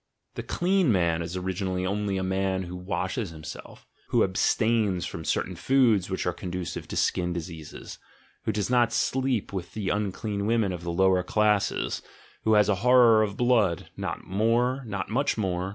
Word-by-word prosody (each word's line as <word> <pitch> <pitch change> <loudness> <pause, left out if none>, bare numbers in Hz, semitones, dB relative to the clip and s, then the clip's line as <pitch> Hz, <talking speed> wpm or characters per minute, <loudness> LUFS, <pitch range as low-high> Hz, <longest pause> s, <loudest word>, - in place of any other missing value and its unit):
The - - -5
"clean 180 -5 +1
man" 85 -4 +2
is 85 +2 -4
originally 95 0 -2
only 100 0 -1
a 95 - -1
man 95 0 0
who 90 0 -7
washes 90 +3 -3
himself, 80 -1 -10 0.2
who - - +3
abstains 110 -6 +1
from 80 - -6
certain 90 +3 -1
foods 115 -3 +3
which 95 - -2
are 90 - 0
conducive 90 -1 -5
to - - -6
skin 90 -1 +1
diseases, 80 -2 -8 0.5
who - - +1
does 105 -2 -1
not 120 -2 +3
sleep 130 -4 0
with 90 -2 -5
the 105 -3 -2
unclean 100 0 -2
women 110 -4 +2
of 85 - -6
the 85 0 -4
lower 95 +1 +3
classes, 105 +2 +1 0.4
who 110 - +4
has 105 -1 +5
a 105 - +3
horror 120 -3 +6
of 105 -2 -1
blood 115 -8 +2
— - - -40
not - - -4
more, 120 +6 +1
not 100 -3 -4
much 135 +3 +1
more! 95 -3 -1
100 Hz, 175 wpm, -26 LUFS, 90-110 Hz, 0.5 s, horror